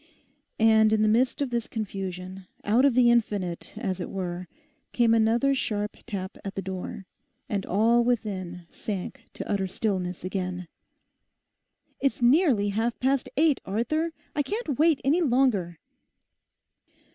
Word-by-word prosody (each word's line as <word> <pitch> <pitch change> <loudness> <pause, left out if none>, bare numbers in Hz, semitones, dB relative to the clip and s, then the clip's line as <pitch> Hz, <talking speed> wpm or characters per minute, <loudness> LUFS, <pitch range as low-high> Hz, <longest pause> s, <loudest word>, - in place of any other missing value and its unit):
And 220 -1 +5
in 215 0 +3
the - - +4
midst 245 +6 +2
of 265 - -4
this 235 -1 -1
confusion, 190 -3 -5 0.2
out 230 +6 +3
of 275 -4 +3
the 245 -1 +6
infinite, 205 -8 -1
as 195 -5 -3
it 175 - -4
were, 180 -2 -4 0.5
came 235 -2 +4
another 230 +5 +3
sharp 210 -5 -2
tap 195 -4 -5
at 195 -1 -6
the 195 - -2
door, 190 +1 -6 0.4
and 200 -2 -2
all 230 +5 +3
within 190 -7 -2
sank 200 -4 -6
to - - -6
utter 195 -2 0
stillness 185 -3 -2
again. 185 -1 -3 1.3
'It's 275 - 0
nearly 245 - +4
half 225 +3 -1
past 265 +1 +1
eight, 310 -2 +3
Arthur; 310 +12 -1 0.2
I 290 - +2
can't 345 - -3
wait 315 -2 +4
any 305 +7 +3
longer. 240 - +2
220 Hz, 140 wpm, -26 LUFS, 190-250 Hz, 1.3 s, the